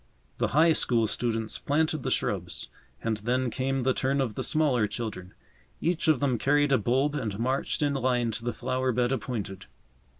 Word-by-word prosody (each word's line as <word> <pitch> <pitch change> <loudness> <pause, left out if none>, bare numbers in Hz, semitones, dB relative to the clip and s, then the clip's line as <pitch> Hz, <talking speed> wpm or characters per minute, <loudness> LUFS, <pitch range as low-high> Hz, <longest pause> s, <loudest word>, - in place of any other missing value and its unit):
The - - +2
High 165 +1 +6
School 120 -6 +3
students 115 0 -2
planted 155 +1 0
the - - -2
shrubs, - - -2 0.3
and 115 -2 0
then 125 +3 -1
came 135 +1 -1
the 130 +1 +2
turn 135 +2 0
of 125 -5 0
the - - -4
smaller 140 -8 +2
children. 105 -4 -6 0.4
Each 170 0 0
of 155 -5 +4
them 130 -5 +1
carried 145 0 +2
a 135 - +4
bulb 130 +7 +1
and 115 -9 -3
marched 130 +5 -1
in 145 -1 +1
line 125 -3 +1
to 110 +2 -4
the 120 - -1
flower 130 +1 -1
bed 120 +1 +1
appointed. 105 -6 -4
125 Hz, 180 wpm, -27 LUFS, 115-140 Hz, 0.4 s, High